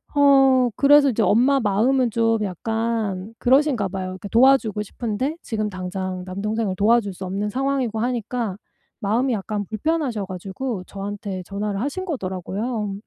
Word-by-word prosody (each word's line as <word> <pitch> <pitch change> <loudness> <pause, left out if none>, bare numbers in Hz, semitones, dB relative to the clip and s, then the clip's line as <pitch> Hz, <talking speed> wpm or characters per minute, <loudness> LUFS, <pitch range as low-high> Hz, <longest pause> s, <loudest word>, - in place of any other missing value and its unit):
어 270 -3 +5
그래서 285 0 +6
이제 225 -2 +1
엄마 260 +7 +4
마음은 235 +4 +2
좀 225 -1 +1
약간 220 0 -2
그러신가 260 -5 +3
봐요. 190 0 -4
그러니까 185 +2 -7
도와주고 230 -4 +4
싶은데 245 +8 -3
지금 215 -2 -2
당장 185 0 -4
남동생을 205 +1 -2
도와줄 210 0 +2
수 190 - -6
없는 200 +3 -2
상황이고 265 -1 -1
하니까 235 -3 -2 0.5
마음이 235 +6 +1
약간 205 -1 -3
불편하셔 240 - -1
가지고 190 +4 -5
저한테 200 -1 -5
전화를 200 +1 -3
하신 330 +8 -3
거더라고요. 210 - -3
220 Hz, 355 characters per minute, -22 LUFS, 195-255 Hz, 0.5 s, 그래서